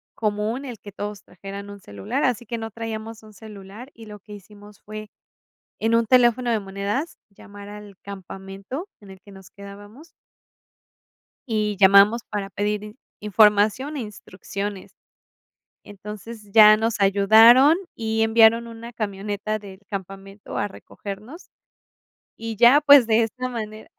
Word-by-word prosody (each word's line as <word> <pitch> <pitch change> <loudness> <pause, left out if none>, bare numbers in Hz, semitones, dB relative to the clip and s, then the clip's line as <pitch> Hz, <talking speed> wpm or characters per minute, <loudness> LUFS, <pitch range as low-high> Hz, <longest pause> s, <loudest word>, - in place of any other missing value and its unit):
común 215 +5 -2
el 240 -5 -8
que 205 - -12
todos 205 0 -7
trajeran 200 +2 -10
un 205 0 -10
celular, 100 - -5
así 240 -3 -1
que 235 +1 -4
no 225 -1 -6
traíamos 225 0 -7
un 215 -1 -16
celular 210 +4 -12
y 225 -1 -14
lo 210 0 -10
que 210 +2 -14
hicimos 205 +1 -15
fue 215 0 -9 0.7
en 225 +1 +1
un 230 - +2
teléfono 240 0 +3
de 220 - +1
monedas 200 - -4 0.2
llamar 205 0 -13
al 205 -2 -12
campamento 195 - -8
en 200 - -15
el 190 - -13
que 200 +1 -17
nos 190 -1 -15
quedábamos 205 +9 -13 1.4
Y 215 -3 -1
llamamos 200 +4 +6
para 200 -1 -5
pedir 210 +1 -2
in 210 +3 -11 0.3
información 210 +7 +2
e 265 - -3
instrucciones. 200 -1 -7 0.9
Entonces, 210 +1 -10
ya 215 -1 +8
nos 225 0 -2
ayudaron 220 - +6 0.2
y 220 0 -2
enviaron 225 +1 +4
una 230 +1 -10
camioneta 205 0 -4
del 195 -2 -13
campamento 195 +1 -8
a 205 - -1
recogernos. 210 - -11 0.9
Y 225 -1 -6
ya, 240 +7 +6
pues 285 -5 +7
de 225 +1 +3
esa 255 +3 -4
manera 215 -2 -7
210 Hz, 145 wpm, -22 LUFS, 200-230 Hz, 1.4 s, ya